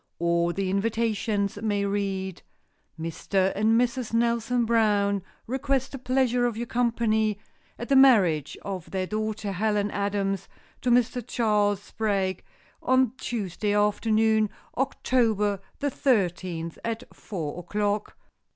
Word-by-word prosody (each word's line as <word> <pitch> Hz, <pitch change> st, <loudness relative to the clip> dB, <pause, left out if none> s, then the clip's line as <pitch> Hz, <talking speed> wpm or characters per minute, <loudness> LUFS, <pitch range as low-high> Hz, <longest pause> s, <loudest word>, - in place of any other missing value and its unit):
Or 170 Hz, 0 st, +1 dB
the 190 Hz, +1 st, -2 dB
invitations 210 Hz, -1 st, 0 dB
may 205 Hz, -2 st, 0 dB
read: 195 Hz, -2 st, -2 dB, 0.6 s
"Mr. 185 Hz, +4 st, 0 dB
and 220 Hz, +3 st, +3 dB
Mrs. 245 Hz, -1 st, -1 dB
Nelson 235 Hz, +1 st, +1 dB
Brown 205 Hz, -3 st, +2 dB, 0.2 s
request 265 Hz, +1 st, -1 dB
the 270 Hz, -, -6 dB
pleasure 250 Hz, -1 st, +2 dB
of 230 Hz, -2 st, -4 dB
your 235 Hz, -, -2 dB
company 225 Hz, -3 st, +1 dB, 0.4 s
at 240 Hz, -, -6 dB
the 275 Hz, -, +3 dB
marriage 195 Hz, -, +5 dB
of 190 Hz, -4 st, -5 dB
their 190 Hz, -1 st, -2 dB
daughter, 215 Hz, 0 st, -3 dB
Helen 210 Hz, +1 st, 0 dB
Adams, 200 Hz, -1 st, -1 dB, 0.3 s
to 250 Hz, -, 0 dB
Mr. 245 Hz, 0 st, +2 dB
Charles 210 Hz, -4 st, +1 dB
Sprague, 200 Hz, -4 st, -1 dB, 0.4 s
on 260 Hz, -2 st, +3 dB
Tuesday 205 Hz, -2 st, -2 dB
afternoon, 215 Hz, +1 st, +2 dB, 0.3 s
October 225 Hz, -6 st, +1 dB, 0.2 s
the 285 Hz, 0 st, -1 dB
thirteenth, 180 Hz, -, 0 dB
at 230 Hz, +1 st, -3 dB
four 165 Hz, -6 st, -5 dB
o'clock." 205 Hz, +3 st, -2 dB
210 Hz, 120 wpm, -26 LUFS, 195-235 Hz, 0.6 s, marriage